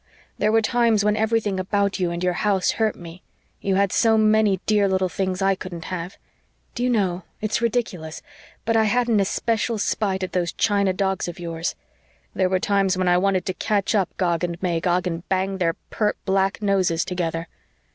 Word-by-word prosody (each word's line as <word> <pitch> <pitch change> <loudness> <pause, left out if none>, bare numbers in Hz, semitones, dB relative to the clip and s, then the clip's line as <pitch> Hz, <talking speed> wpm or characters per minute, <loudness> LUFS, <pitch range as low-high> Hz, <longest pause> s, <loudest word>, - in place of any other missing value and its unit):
There 215 - +2
were 225 0 +3
times 230 -2 +2
when 210 0 +3
everything 220 -3 0
about 200 +1 0
you 180 -2 +1
and 170 +1 -4
your 180 0 +2
house 195 0 +1
hurt 220 -1 0
me. 170 +1 -11 0.4
You 195 -1 0
had 200 -1 +2
so 225 -1 +3
many 215 -3 +3
dear 210 -2 +3
little 190 -1 +1
things 185 +3 -2
I 195 0 +4
couldn't 185 -3 -7
have. 175 +2 -5 0.6
Do 240 - -5
you 250 - +2
know 190 -6 +1 0.2
it's 215 +2 -1
ridiculous 215 -9 -2 0.4
but 230 0 +1
I 220 -1 +4
had 245 +3 +1
an 220 -3 +3
especial 225 +3 0
spite 195 -2 -1
at 185 - -3
those 175 -2 -1
china 200 -2 +2
dogs 190 0 -1
of 175 - -7
yours. 165 -1 -3 0.6
There 185 -1 +1
were 185 - +2
times 195 -1 +1
when 185 0 0
I 180 0 +4
wanted 190 -1 +1
to 185 - -2
catch 205 +2 0
up 195 -5 +2
Gog 175 -2 0
and 170 -1 -2
Magog 175 +1 +1
and 170 -1 -4
bang 190 0 0
their 165 -2 +1 0.2
pert 210 -1 0
black 195 +1 +1
noses 185 -5 +1
together! 165 -2 -3
190 Hz, 195 wpm, -23 LUFS, 180-210 Hz, 0.6 s, I